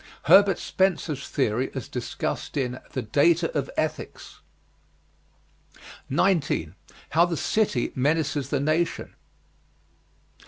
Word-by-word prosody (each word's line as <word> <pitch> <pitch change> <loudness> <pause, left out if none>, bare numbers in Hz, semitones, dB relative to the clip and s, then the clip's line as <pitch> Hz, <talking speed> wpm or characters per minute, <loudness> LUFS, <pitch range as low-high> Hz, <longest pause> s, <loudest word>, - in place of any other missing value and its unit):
Herbert 200 -1 +6
Spencer's 160 -7 -1
theory 130 -1 0
as 130 - -5
discussed 125 +3 -4
in 125 -2 -2
"The 130 - -2
Data 165 +8 +2
of 140 -2 -1
Ethics." 155 - -4 1.7
19. 140 - +1 0.4
HOW 165 +3 +5
THE 170 -2 -3
CITY 205 - 0
MENACES 145 0 0
THE 140 -1 0
NATION. 155 +4 -1
145 Hz, 95 wpm, -25 LUFS, 130-170 Hz, 1.7 s, Herbert